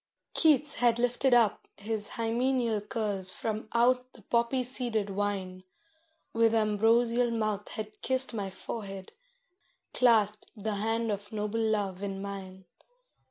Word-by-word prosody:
Keats 300 -3 +4
had 240 -1 +4
lifted 245 +2 +1
up 235 -4 +3
his 210 0 -1
hymeneal 235 -1 0
curls 205 -3 -1
from 215 +4 -3
out 250 +2 +2
the 220 - -17
poppy 235 +4 +1
seeded 235 -5 -1
wine, 190 -2 -3 0.7
With 230 0 +3
ambrosial 230 +3 +3
mouth 215 -3 -2
had 215 0 -7
kissed 260 -1 +2
my 200 -3 -3
forehead, 195 0 -7 0.8
clasped 215 -4 +3
the 210 0 -2
hand 225 +2 0
of 205 0 -5
noble 210 +1 -2
love 205 -4 -1
in 195 -1 -4
mine. 190 -1 -7
220 Hz, 125 wpm, -29 LUFS, 205-235 Hz, 0.8 s, Keats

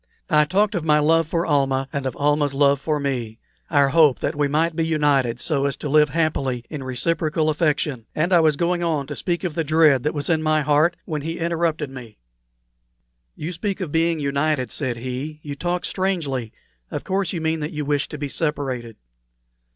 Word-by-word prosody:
I 150 -1 +5
talked 200 +6 +1
of 175 -5 -2
my 150 -1 +4
love 160 +2 +3
for 165 +1 -1
Almah 135 -3 +1
and 140 -2 -2
of 130 - -4
Almah's 145 -1 +1
love 140 0 +3
for 150 -1 -1
me; 125 -6 -3 0.3
our 140 -3 +4
hope 150 -3 +5
that - - -2
we 145 0 +1
might 160 +3 +1
be 165 - 0
united 145 -7 +1
so 140 +1 0
as 140 - -3
to 150 - -5
live 150 +1 +4
happily 135 -6 -1
in 150 -3 -5
reciprocal 155 +4 0
affection; 150 -6 -1
and 170 +5 +1
I 175 - +7
was 155 -2 +3
going 175 +1 0
on 155 -4 0
to - - -6
speak 175 -1 -2
of 175 -4 -2
the 165 - -1
dread 155 -3 +4
that 150 +3 -2
was 145 - -2
in 160 -2 +2
my 155 0 +2
heart 150 +4 +3
when 155 -2 -3
he 165 +3 -4
interrupted 165 -3 -1
me: 125 -5 -10 1.2
"You 160 +4 -5
speak 195 +4 -3
of 180 -6 -4
being 165 0 +1
united," 140 -1 0
said 130 -5 -2
he. 130 +5 -5
"You 145 -1 -5
talk 175 +3 -2
strangely. 150 - -2 0.4
Of - - -5
course 190 -2 -1
you 175 - -3
mean 160 0 -1
that 150 +1 -4
you 150 -2 -4
wish 145 -1 0
to 150 - -6
be 145 0 -3
separated." 135 -7 -2
150 Hz, 205 wpm, -22 LUFS, 140-165 Hz, 1.2 s, I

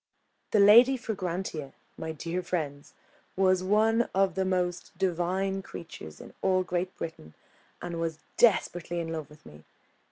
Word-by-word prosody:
The 215 - +3
Lady 235 +6 +8
Fragrantia, 180 - -4 0.2
my 160 - -5
dear 165 +3 -3
friends, 145 -6 -4 0.4
was 185 -1 +3
one 220 +4 +3
of 195 -1 +3
the 190 +1 0
most 180 -1 -2
divine 190 +2 0
creatures 160 - -10
in - - -12
all 185 -1 +2
Great 180 +1 -3
Britain, 80 - -7 0.5
and 170 -1 -4
was 165 -2 -2 0.2
desperately 175 -6 +2
in 165 -1 -3
love 155 -3 -5
with 150 0 -18
me. 75 0 -14
180 Hz, 140 wpm, -28 LUFS, 165-195 Hz, 0.5 s, Lady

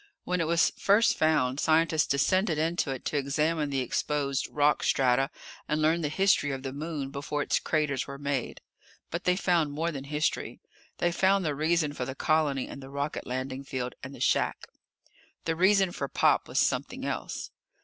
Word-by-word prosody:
When 180 -1 -1
it 165 - 0
was 170 0 +3
first 205 +3 +4
found, 145 -4 +2
scientists 160 -1 +3
descended 170 +5 +2
into 160 -1 0
it 130 -2 -5
to 150 - -1
examine 150 +2 0
the 135 -2 0
exposed 140 +1 -1
rock 150 0 +2
strata 135 0 +2 0.4
and 150 - 0
learn 160 +2 +2
the 150 - -1
history 190 -2 +2
of 135 -1 -4
the 135 -1 -4
Moon 145 -2 -4
before 145 +1 -3
its - - +1
craters 150 -4 -1
were 140 -1 -7
made. 140 -3 -3 0.5
But 170 +2 -4
they 180 - +3
found 170 -6 +1
more 165 +3 -1
than 140 -3 -6
history. 150 +2 -2 0.4
They 175 - +1
found 190 +1 +2
the 150 - 0
reason 155 +1 +1
for 125 - -4
the 130 +1 -5
colony 145 -3 +1
and 140 - -9
the 135 - -10
rocket 140 +2 -4
landing 130 +1 -4
field 130 -2 -4
and 135 +1 -8
the - - -12
shack. - - +1 0.8
The 165 - 0
reason 190 +1 +4
for 140 - -4
Pop - - +2
was - - -5
something - - 0
else. - - -4
150 Hz, 185 wpm, -28 LUFS, 140-165 Hz, 0.8 s, first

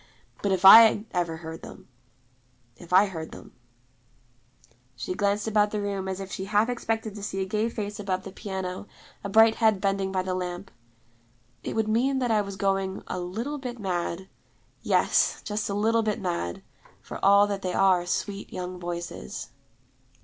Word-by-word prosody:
But 200 - 0
if 190 0 +1
I 225 +4 +12 0.3
heard 165 -2 -3
them - - -12 0.9
if 170 +8 -14
I 190 +3 +6
heard 160 -5 -7
them, - - -12 0.7
' 120 +1 -34
she 130 +9 -4
glanced 200 +1 0
about 210 -1 +3
the 210 - -3
room 200 -2 -3
as 190 0 -3
if 195 -1 -7
she 190 - -4
half 210 +3 +2
expected 225 -3 -2
to 205 - -9
see 195 -1 -4
a 190 - 0
gay 215 +4 -1
face 205 -2 -5
above 190 -2 -2
the 195 - -8
piano, 190 -1 -5 0.4
a 200 - -4
bright 220 +2 +5
head 220 -4 +3
bending 195 -1 -1
by 185 -1 -1
the 185 0 -2
lamp, 180 +1 -5 0.9
'it - - -5
would 220 -1 0
mean 250 +5 +1
that 250 -3 0
I 215 -1 +3
was 200 -1 -6
going 195 -1 -1
a 185 - -4
little 225 +12 -4
bit 250 -2 -6
mad: 185 -2 -3 0.5
yes, - - +2
just 210 0 -3
a 200 - -2
little 225 +2 +2
bit 215 -2 -1
mad, 170 - -3 0.4
for - - -9
all 200 +1 +6
that 200 -1 -3
they 180 -1 -3
are 185 -2 +3
sweet, 200 +3 -3
young 180 0 -6
voices.' 175 - -6
195 Hz, 180 wpm, -26 LUFS, 180-210 Hz, 0.9 s, I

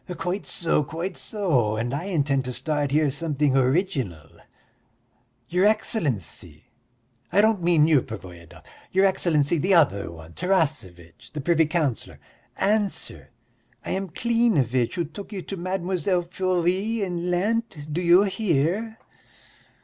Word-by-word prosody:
"Quite 185 +3 -3
so, 165 -3 +1
quite 165 +7 -5
so, 145 - 0
and 120 +3 -2
I 145 +6 -3
intend 145 -8 0
to 125 - -4
start 145 +1 -1
here 150 0 +2
something 145 -1 0
original. 130 - 0 1.2
Your 180 +6 +3
Excellency 125 - -2 0.7
I 195 - +3
don't 215 -2 +3
mean 165 -3 +4
you, 150 -5 +4
Pervoyedov 85 -6 -11 0.3
your 190 +1 +4
Excellency 165 -5 +2
the 190 +4 +3
other 130 - +3
one, 80 0 -12
Tarasevitch, 120 - -2
the 150 - -4
privy 165 +1 +2
councillor! 155 -7 -2 0.4
Answer! 205 0 -1 0.6
I - - -3
am 190 0 -2
Klinevitch, 165 - +1
who 170 -2 -1
took 195 +8 -10
you 195 -4 -5
to 195 - -6
Mlle. 185 0 -1
Furie 185 +4 0
in 175 -2 -3
Lent, 180 -5 -1
do 175 - -1
you 175 +2 +6
hear?" 195 +2 0
170 Hz, 130 wpm, -24 LUFS, 135-190 Hz, 1.2 s, you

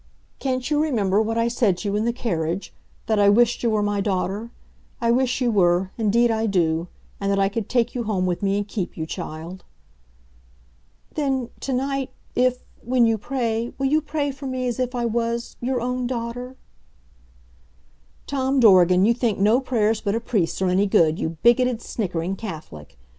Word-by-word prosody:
"Can't 255 0 -2
you 300 0 +3
remember 215 -9 +1
what 225 +1 -1
I 230 0 +2
said 230 -6 +1
to 205 - -5
you 200 - -1
in 210 +2 0
the 235 - +2
carriage 180 -7 -3 0.3
that 220 -2 +1
I 200 0 +6
wished 235 +3 +3
you 235 - +1
were 215 -1 +1
my 205 -1 0
daughter. 195 +3 -2 0.5
I 235 -3 +2
wish 250 +1 +1
you 245 -2 +2
were, 185 -2 +2
indeed 230 +2 +2
I 225 0 0
do, 170 -4 +1 0.3
and 200 0 -1
that 200 - +1
I 195 0 +3
could 210 0 -4
take 240 -2 +1
you 240 -2 -3
home 195 -4 0
with 180 +1 -1
me 200 0 +1
and 205 0 -2
keep 200 -4 -4
you, 160 - -3
child." 170 +2 -7 1.5
"Then 265 -5 -1
to 275 - -4
night 270 +1 -1 0.2
if 250 0 +1 0.2
when 245 0 +3
you 225 -1 +1
pray 235 -1 -2
will 275 - -1
you 300 +3 +3
pray 295 -1 -2
for 275 0 -8
me 255 -1 -2
as 245 0 -2
if 255 0 -1
I 240 -1 -1
was 235 +1 -2
your 250 +1 0
own 250 +1 -2
daughter?" 245 +1 -5 1.7
Tom 270 -1 0
Dorgan, 185 -4 +6
you 230 - +4
think 235 -4 0
no 215 +5 +4
prayers 225 -4 +1
but 205 -1 -1
a - - +1
priest's 200 -6 -1
are - - +2
any 190 +3 +2
good, 160 -4 +3
you 160 0 -3
bigoted, 240 0 +4
snickering 185 -5 -3
Catholic! 150 - -9
225 Hz, 190 wpm, -23 LUFS, 195-250 Hz, 1.7 s, I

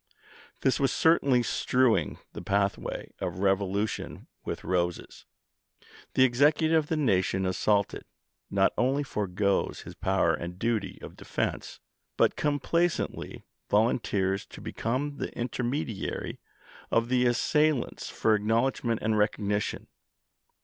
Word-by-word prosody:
This 130 - +2
was 135 -2 +2
certainly 140 -7 +3
strewing 125 0 +1 0.2
the - - -7
pathway 100 0 -1
of 90 -1 -3
rev 95 0 +3
olution 100 +2 -3 0.2
with - - -5
roses. 85 -1 -2 0.9
The 130 - +6
Executive 145 +6 +3
of - - -21
the 160 - 0
nation 95 -8 +1
assaulted, 100 +2 0 0.4
not 95 0 +2
only 135 +4 +2
foregoes 100 -5 -1
his - - -10
power - - +1
and 85 +1 -5
duty 115 +1 -1
of - - -9
defense, - - -3 0.4
but - - +3
complacently 160 +4 -1 0.3
volunteers 100 -3 +1
to - - -12
become 140 +5 -3
the - - -4
intermediary 120 -1 -3 0.5
of 115 +1 +1
the 125 -1 +3
assailants 150 +3 +1
for 110 - +2
acknowledgment 115 +2 +1
and 110 0 +1
recognition. 105 0 0
115 Hz, 115 wpm, -28 LUFS, 100-130 Hz, 0.9 s, The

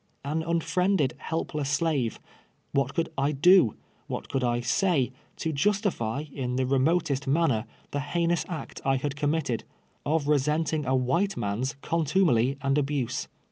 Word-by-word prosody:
An 155 +3 -1
unfriended, 170 -1 +1
helpless 155 -3 -3
slave 145 -5 0 0.3
— - - -40
what 135 -1 0
could 165 - 0
I 140 +2 +2
do^ 170 - +5 0.3
what - - -5
could 135 - -1
I 120 -1 +1
.SY?y, 150 -2 +1 0.3
to 160 - -2
justify, 150 - 0
in 125 -2 -2
the 130 0 +1
remotest 140 +1 +1
manner, 135 -6 +2 0.3
the 145 - -1
heinous 170 +3 0
act 165 -3 -6
I 135 0 +2
had 135 +2 -2
committed, 145 -5 0 0.4
of 150 0 0
resenting 150 +1 +1
a 130 - +2
wldte, 170 +11 +1
man's 105 +6 -2
contumely 155 -6 +2
and 135 +1 +2
abuse. 140 -4 -1
145 Hz, 145 wpm, -27 LUFS, 130-165 Hz, 0.4 s, do^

